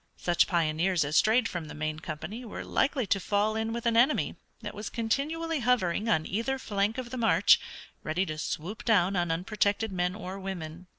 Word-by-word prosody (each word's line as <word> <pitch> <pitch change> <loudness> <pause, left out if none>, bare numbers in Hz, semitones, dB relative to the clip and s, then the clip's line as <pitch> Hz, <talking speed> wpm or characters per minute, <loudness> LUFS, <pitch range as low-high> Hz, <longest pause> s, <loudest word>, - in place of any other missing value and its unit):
Such 175 -1 +2
pioneers 170 0 +1
as 145 +2 -2
strayed 225 +6 +4
from 175 -4 -5
the 150 - -9
main 155 0 -3
company 205 +11 -6
were 225 - -7
likely 270 -3 +1
to 195 - +1
fall 205 +3 +1
in 220 0 -1
with 235 +1 -4
an 230 -1 +2
enemy 250 +6 +3 0.3
that - - -5
was 210 0 -6
continually 305 +8 -1
hovering 230 -4 +1
on 160 -7 +2
either 230 +7 -1
flank 205 -2 -1
of 245 -2 -5
the 255 - -4
march, 230 -2 +5 0.4
ready 170 +5 -1
to 155 -3 -5
swoop 180 +8 -4
down 200 -4 +3
upon 175 -1 0
unprotected 205 +5 0
men 180 0 -1
or 195 -2 -6
women. 180 -2 -6
200 Hz, 190 wpm, -29 LUFS, 175-230 Hz, 0.4 s, march